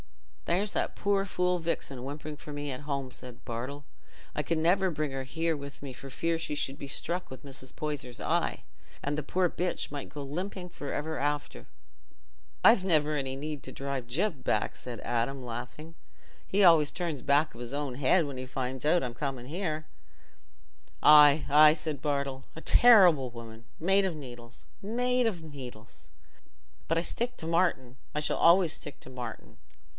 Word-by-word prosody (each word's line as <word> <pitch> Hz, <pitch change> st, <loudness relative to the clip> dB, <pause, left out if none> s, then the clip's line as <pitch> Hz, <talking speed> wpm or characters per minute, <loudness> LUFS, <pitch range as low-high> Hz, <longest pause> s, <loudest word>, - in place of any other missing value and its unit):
"There's 195 Hz, +4 st, 0 dB
that -, -, -1 dB
poor 200 Hz, -1 st, +2 dB
fool, 180 Hz, -2 st, 0 dB
Vixen, 140 Hz, -6 st, -3 dB
whimpering 150 Hz, +2 st, -6 dB
for 150 Hz, +1 st, -10 dB
me 145 Hz, -1 st, -4 dB
at 130 Hz, -, -6 dB
home," 140 Hz, -3 st, -3 dB
said 125 Hz, 0 st, -10 dB
Bartle. 130 Hz, +5 st, -5 dB, 0.5 s
"I -, -, +1 dB
can 160 Hz, +2 st, 0 dB
never 185 Hz, +3 st, +3 dB
bring 155 Hz, -3 st, -2 dB
her 135 Hz, 0 st, -3 dB
here 160 Hz, +4 st, -1 dB
with 140 Hz, -1 st, -9 dB
me 135 Hz, -2 st, -6 dB
for 135 Hz, +2 st, -10 dB
fear 165 Hz, +5 st, -1 dB
she 160 Hz, -2 st, -2 dB
should 135 Hz, -1 st, -2 dB
be 140 Hz, -, -7 dB
struck 175 Hz, +6 st, -3 dB
with 130 Hz, +2 st, -10 dB
Mrs. 130 Hz, -2 st, -10 dB
Poyser's 145 Hz, -5 st, -5 dB
eye, -, -, 0 dB, 0.4 s
and 145 Hz, +1 st, -2 dB
the 150 Hz, -, -2 dB
poor 185 Hz, +5 st, +1 dB
bitch 175 Hz, -2 st, -2 dB
might 145 Hz, -1 st, -6 dB
go 145 Hz, 0 st, -7 dB
limping 180 Hz, +5 st, -5 dB
for 145 Hz, -4 st, -6 dB
ever 160 Hz, +2 st, -3 dB
after." 145 Hz, -, -2 dB, 1.0 s
"I've 225 Hz, -4 st, +7 dB
never 155 Hz, -4 st, +2 dB
any 135 Hz, -2 st, -2 dB
need 150 Hz, 0 st, -5 dB
to -, -, -5 dB
drive 135 Hz, -3 st, -4 dB
Gyp 155 Hz, -, -1 dB
back," -, -, 0 dB
said 120 Hz, -3 st, -7 dB
Adam, 120 Hz, +3 st, -1 dB
laughing. 125 Hz, +7 st, -7 dB, 0.5 s
"He 200 Hz, +1 st, +2 dB
always 165 Hz, -5 st, +6 dB
turns 165 Hz, -7 st, -3 dB
back 145 Hz, +2 st, +3 dB
of 115 Hz, -, -11 dB
his 120 Hz, 0 st, -6 dB
own 140 Hz, -3 st, -3 dB
head 145 Hz, +6 st, +3 dB
when 140 Hz, -2 st, -6 dB
he 130 Hz, -, -5 dB
finds 130 Hz, 0 st, -4 dB
out 160 Hz, +2 st, +3 dB
I'm 125 Hz, -2 st, -3 dB
coming 130 Hz, -1 st, -4 dB
here." 155 Hz, 0 st, -3 dB, 1.2 s
"Aye, 150 Hz, 0 st, +8 dB
aye," 150 Hz, +2 st, +7 dB
said 155 Hz, -3 st, -4 dB
Bartle. 140 Hz, -2 st, -1 dB
"A -, -, -7 dB
terrible 180 Hz, -, +6 dB
woman!—made 115 Hz, -, -1 dB
of 185 Hz, -4 st, -1 dB
needles, 120 Hz, -4 st, -10 dB, 0.2 s
made 245 Hz, +3 st, +1 dB
of 180 Hz, -7 st, -3 dB
needles. 125 Hz, -7 st, -10 dB, 0.8 s
But 165 Hz, -, +2 dB
I -, -, +3 dB
stick 245 Hz, +7 st, -2 dB
to 160 Hz, -, -4 dB
Martin—I 150 Hz, -6 st, -1 dB
shall 150 Hz, -, +1 dB
always 170 Hz, -1 st, +5 dB
stick 145 Hz, -, -8 dB
to -, -, -11 dB
Martin. 125 Hz, -1 st, -8 dB
145 Hz, 175 wpm, -29 LUFS, 130-170 Hz, 1.2 s, Aye